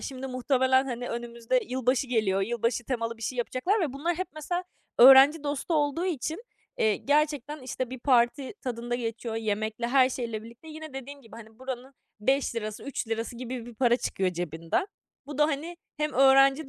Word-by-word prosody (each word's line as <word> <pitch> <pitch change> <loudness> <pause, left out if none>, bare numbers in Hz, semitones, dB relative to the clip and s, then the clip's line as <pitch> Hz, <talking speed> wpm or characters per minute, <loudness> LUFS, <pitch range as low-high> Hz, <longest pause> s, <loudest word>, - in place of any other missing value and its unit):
Şimdi 265 0 -6
muhtemelen, 260 +1 +2
hani, 245 -1 -4
önümüzde 235 +1 -1
yılbaşı 255 +1 +1
geliyor, 215 -5 +1
yılbaşı 235 +2 -1
temalı 230 -2 -2
bir 225 - -12
şey 250 +2 -3
yapacaklar 355 - 0
ve 295 -7 -1
bunlar 330 +5 -1
hep 370 - -2
mesela 350 +4 -3 0.3
öğrenci 270 +4 +9
dostu 290 +3 -2
olduğu 295 +3 +1
için, 330 - -3 0.4
eee, 215 -2 +3
gerçekten, 295 0 0
işte, 255 -1 -4
bir 260 - -6
parti 255 +3 +2
tadında 240 -1 -3
geçiyor, 230 -1 -4
yemekle, 220 +1 -2
her 260 0 +5
şeyle 230 -4 -4
birlikte. 235 +7 -13
Yine 315 -2 -9
dediğim 275 +1 -8
gibi, 225 0 -13
hani, 220 0 -13
buranın 260 +1 -7 0.3
5 270 +3 +1
lirası, 215 -2 -5
3 260 -4 -4
lirası 230 +1 -3
gibi 245 -1 -6
bir 240 - -10
para 240 0 +3
çıkıyor 190 -6 -1
cebinden. 170 - -2 0.4
Bu 290 0 -7
da, 300 - +5
hani, 315 +3 -3 0.2
hem 300 0 -1
öğrenci 270 +2 +5
255 Hz, 175 wpm, -27 LUFS, 235-280 Hz, 0.4 s, öğrenci